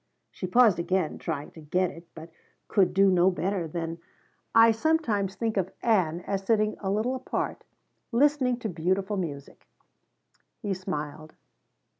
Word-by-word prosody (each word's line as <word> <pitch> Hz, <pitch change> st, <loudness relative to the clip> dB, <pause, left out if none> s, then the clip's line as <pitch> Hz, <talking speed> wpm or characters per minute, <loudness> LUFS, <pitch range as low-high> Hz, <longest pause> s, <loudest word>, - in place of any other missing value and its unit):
She 185 Hz, -, -5 dB
paused, 215 Hz, -3 st, +5 dB
again 175 Hz, -1 st, -1 dB
trying 145 Hz, -, -4 dB
to 160 Hz, -, -13 dB
get 180 Hz, +4 st, 0 dB
it, 165 Hz, +1 st, -13 dB
but 165 Hz, +1 st, -10 dB, 0.4 s
could 195 Hz, -4 st, +3 dB
do 195 Hz, 0 st, +4 dB
no 180 Hz, 0 st, +4 dB
better 185 Hz, -1 st, -2 dB
than: 165 Hz, +1 st, -4 dB, 0.6 s
"I 225 Hz, 0 st, +8 dB
sometimes 225 Hz, -, 0 dB
think 225 Hz, -2 st, -2 dB
of 190 Hz, -1 st, 0 dB
Ann 180 Hz, -7 st, +2 dB
as 195 Hz, +1 st, -2 dB
sitting 215 Hz, 0 st, +2 dB
a 195 Hz, -, -3 dB
little 215 Hz, +6 st, 0 dB
apart, 260 Hz, -1 st, -3 dB, 0.5 s
listening 260 Hz, -1 st, +3 dB
to 225 Hz, -, -2 dB
beautiful 190 Hz, +3 st, -1 dB
music." 145 Hz, -7 st, -6 dB, 0.9 s
He 205 Hz, -4 st, -2 dB
smiled. 155 Hz, -4 st, -5 dB
190 Hz, 145 wpm, -27 LUFS, 170-220 Hz, 0.9 s, I